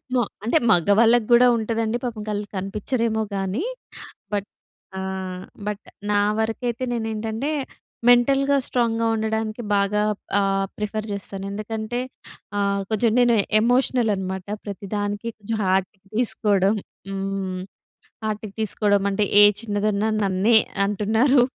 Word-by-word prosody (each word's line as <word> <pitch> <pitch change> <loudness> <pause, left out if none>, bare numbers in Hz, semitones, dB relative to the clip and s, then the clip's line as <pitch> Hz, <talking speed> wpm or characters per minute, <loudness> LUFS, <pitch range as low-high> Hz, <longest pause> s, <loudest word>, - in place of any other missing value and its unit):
మో 245 - +3 0.2
అంటే 240 +8 +3
మగవాళ్ళకి 215 +5 +4
గూడా 245 +1 +7
ఉంటదండి. 225 +1 -1
పాపం 230 -3 -4
కళ్ 205 0 -1
కనిపించరేమోగానీ. 210 - -2 0.7
బట్ 200 -1 -1 0.5
ఆహ్, 190 -1 -4 0.2
బట్ 210 0 -3 0.3
నా 205 - +3 0.2
వరకైతే 230 +2 -2
నేనేంటంటే 225 +3 -2 0.6
మెంటల్‌గా 275 +3 +4
స్ట్రాంగ్‌గా 230 -2 +1
ఉండడానికి 220 +1 -2
బాగా 200 +1 +2 0.4
ఆహ్, 195 0 +1
ప్రిఫర్ 210 0 -3
చేస్తాను. 195 0 -6
ఎందుకంటే 220 +3 -4 0.6
ఆహ్, 200 0 +1
కొంచెం 220 +1 +2
నేను 240 -1 +5 0.3
ఎమోషనల్ 245 -1 +2
అనమాట. 190 -1 -4 0.2
ప్రతి‌దానికి 205 +2 -4
కొంచెం 220 +1 -4
హార్ట్‌కి 190 +1 0 0.2
తీసుకోవడం 205 -4 +2 0.4
హ్మ్. 195 -1 -3 0.6
హార్ట్‌కి 215 -1 -3
తీసుకోవడం 205 -1 +1
అంటే 205 +1 +1 0.2
ఏ - - +10 0.2
చిన్నదున్నా 210 -1 0
నన్నే 200 +4 +3 0.3
అంటున్నారు 220 +6 +3
215 Hz, 110 wpm, -23 LUFS, 200-230 Hz, 0.7 s, ఏ